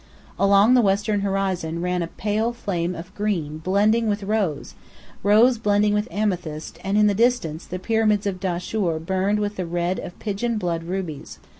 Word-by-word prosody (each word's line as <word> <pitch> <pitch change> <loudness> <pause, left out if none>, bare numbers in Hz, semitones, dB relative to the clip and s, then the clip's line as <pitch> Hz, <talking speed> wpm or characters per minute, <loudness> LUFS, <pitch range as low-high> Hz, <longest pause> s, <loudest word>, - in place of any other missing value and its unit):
Along 200 +4 +5
the 250 - +6
western 205 0 +1
horizon 190 -4 -1
ran 180 0 -1
a 170 - -2
pale 215 +6 -1
flame 180 -6 -2
of 175 +3 -9
green 170 -8 -2
blending 210 +6 +2
with 205 0 -1
rose, 195 -8 -1 0.5
rose 220 +4 +4
blending 205 -1 +2
with 210 +2 0
amethyst, 180 -7 -3
and 195 +2 0
in 210 - +5
the 205 - +3
distance 225 -8 +1
the 185 - -5
Pyramids 215 +1 +1
of 195 -2 -2
Dahshur 180 -1 -1
burned 190 +5 0
with 205 0 -2
the 185 - -2
red 175 +2 -1
of 175 - -8
pigeon 220 +2 -2
blood 170 -4 -2
rubies. 175 -5 -5
195 Hz, 170 wpm, -23 LUFS, 175-210 Hz, 0.5 s, the